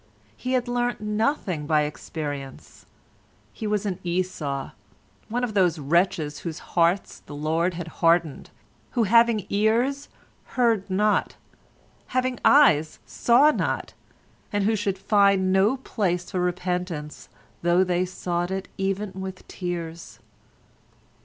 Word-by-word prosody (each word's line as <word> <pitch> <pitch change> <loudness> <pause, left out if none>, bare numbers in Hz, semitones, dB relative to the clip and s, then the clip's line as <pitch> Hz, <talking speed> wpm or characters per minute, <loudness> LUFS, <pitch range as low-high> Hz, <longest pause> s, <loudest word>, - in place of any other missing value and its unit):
He 255 - -3
had 250 -1 +1
learnt 245 -1 -1
nothing 210 - -1
by 155 -1 +3
experience: 145 -2 -7 0.7
he 220 - -5
was 210 -1 0
an 190 -2 -2
Esau—one 175 - -4
of 235 -3 -2
those 180 -5 +3
wretches 155 0 0
whose 165 -3 -5 0.2
hearts 175 +3 +1
the 145 - -8
Lord 165 +4 0
had 170 -1 -5
hardened, 165 -3 +2 0.4
who, 240 - +2
having 230 -1 +4
ears, 235 +7 +1 0.5
heard 225 -5 +2
not, 210 +3 +1 0.8
having 255 -1 0
eyes 160 - +5
saw 260 +6 +4
not, - - -2 0.6
and 205 -1 0
who 220 +2 +2
should 195 -2 -1
find 195 -1 +3
no 200 +7 +3
place 180 -8 -2
for 185 - -1
repentance 180 -3 -3 0.3
though 175 +2 +3
they 180 -1 +1
sought 175 -1 -3
it 190 0 -4
even 195 +1 -1
with 190 0 -7
tears. 170 -2 -6
185 Hz, 120 wpm, -25 LUFS, 170-215 Hz, 0.8 s, eyes